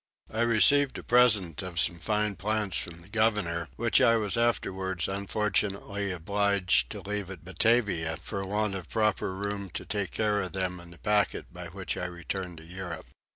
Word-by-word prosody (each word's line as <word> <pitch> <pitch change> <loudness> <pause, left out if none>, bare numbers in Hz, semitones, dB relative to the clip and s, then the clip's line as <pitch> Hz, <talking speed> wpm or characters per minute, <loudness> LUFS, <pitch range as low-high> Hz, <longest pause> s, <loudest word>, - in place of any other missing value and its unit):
I 110 - 0
received 130 +5 +4
a - - -7
present 105 -10 +4
of 90 -3 -3
some 85 0 +1
fine 105 +2 0
plants 105 -1 0
from 85 0 -6
the - - -11
governor, 105 -7 0
which 115 0 +3
I 115 - +6
was 105 -3 0
afterwards 95 -6 0
unfortunately 100 0 -1
obliged 95 -6 +2
to 100 - -6
leave 100 0 -4
at 90 -3 -9
Batavia 95 -4 +2
for 100 -2 -4
want 105 +1 0
of 95 -4 -6
proper 110 -4 +1
room 100 0 -4
to - - -4
take 100 -4 -2
care 105 -2 +1
of 95 - -4
them 90 -1 -2
in 85 0 -12
the 85 - -14
packet 105 -3 0
by 90 -1 -7
which 95 +2 -4
I 90 - -2
returned 90 0 -5
to 80 - -12
Europe. 90 -1 -7
100 Hz, 180 wpm, -29 LUFS, 90-105 Hz, -, I